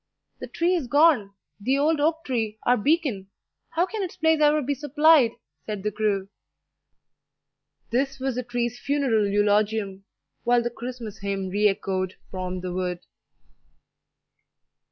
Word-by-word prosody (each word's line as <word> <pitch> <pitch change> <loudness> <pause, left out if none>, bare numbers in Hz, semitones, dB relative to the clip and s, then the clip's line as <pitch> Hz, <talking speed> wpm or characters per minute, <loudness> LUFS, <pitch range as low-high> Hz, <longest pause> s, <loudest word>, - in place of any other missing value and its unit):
"The - - -6
tree 345 +2 0
is 330 -8 -1
gone 270 -8 +3 0.2
the 260 +7 +1
old 305 +2 +2
oak 320 +3 +1
tree, 225 -5 -2
our 245 - +4
beacon! 260 - 0 0.4
How 340 +2 +1
can 415 +3 -5
its 370 - -5
place 320 -1 +2
ever 300 0 +5
be 285 +3 0
supplied?" 295 -2 +4 0.3
said 210 -3 -4
the 210 - -1
crew. 200 -2 -1 1.6
This 270 +3 0
was 265 0 -1
the 250 - -2
tree's 240 0 -3
funeral 265 -8 +1
eulogium, 205 -1 +1 0.4
while 240 0 +3
the 240 - -2
Christmas 240 -3 -7
hymn 195 -1 -3
re 205 +3 +3
echoed 190 -2 -2 0.2
from 185 -1 -4
the 180 -1 -4
wood. 180 -1 -3
240 Hz, 140 wpm, -25 LUFS, 200-290 Hz, 1.6 s, ever